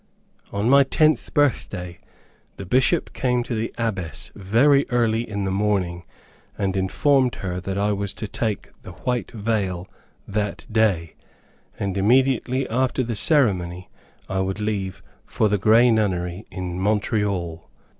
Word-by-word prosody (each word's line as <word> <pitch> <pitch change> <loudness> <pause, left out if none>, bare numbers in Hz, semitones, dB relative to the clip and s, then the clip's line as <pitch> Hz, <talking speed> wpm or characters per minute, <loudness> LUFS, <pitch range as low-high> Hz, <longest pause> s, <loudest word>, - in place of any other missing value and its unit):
On 100 +2 -1
my 140 +2 +7
tenth 155 +3 +2
birthday, 90 - 0 0.6
the 100 - -7
Bishop 130 - +2
came 125 -2 0
to 120 - -5
the 110 0 -2
Abbess 95 - -3
very 125 +9 +3
early 115 -1 +1
in 100 -1 -3
the 95 - -1
morning, 95 -4 0 0.5
and 95 -2 -1
informed 125 +7 +2
her 90 -1 -4
that 95 +1 -4
I 105 +1 +1
was 100 -1 -1
to 110 - -5
take 110 0 -3
the - - -10
White 125 -2 -2
Veil 100 -5 -2 0.4
that 105 0 -3
day, 100 -7 +1 0.6
and 100 -2 -2
immediately 130 +3 +2
after 130 +2 0
the 115 -1 -3
ceremony, 95 - +1 0.4
I 95 - -2
would 95 +2 -2
leave 100 -3 -3 0.2
for 110 - 0
the 105 -1 +1
Grey 115 +5 +5
Nunnery 95 -3 -1
in 90 -1 -5
Montreal. 100 -4 -1
105 Hz, 140 wpm, -23 LUFS, 95-120 Hz, 0.6 s, my